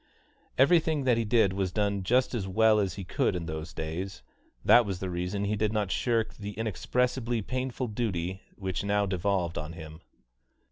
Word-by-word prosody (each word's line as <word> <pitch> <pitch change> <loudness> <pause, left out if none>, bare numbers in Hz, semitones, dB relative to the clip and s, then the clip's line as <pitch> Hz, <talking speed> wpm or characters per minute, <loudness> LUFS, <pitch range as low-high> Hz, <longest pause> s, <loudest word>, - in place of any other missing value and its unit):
Everything 160 +1 +4
that 125 -3 +3
he - - +1
did 110 -3 +3
was 95 -2 -1
done 100 -1 0
just 125 +8 +2
as 105 -6 -2
well 110 +3 +4
as 95 -4 -1
he 100 - -6
could 90 - 0
in 85 -2 -3
those 80 +1 -5
days; 80 -2 -5 0.4
that 120 - +7
was 100 -4 -3
the 95 0 -4
reason 90 +3 -2
he 105 +1 0
did 105 0 0
not 105 -3 -1
shirk 115 0 0
the 105 0 -7
inexpressibly 120 +3 -1
painful 130 +2 -3
duty 95 -5 -2
which 95 -2 -3
now 100 0 +1
devolved 95 -2 -1
on 75 +2 -6
him. 80 0 -10
100 Hz, 180 wpm, -29 LUFS, 90-115 Hz, 0.4 s, that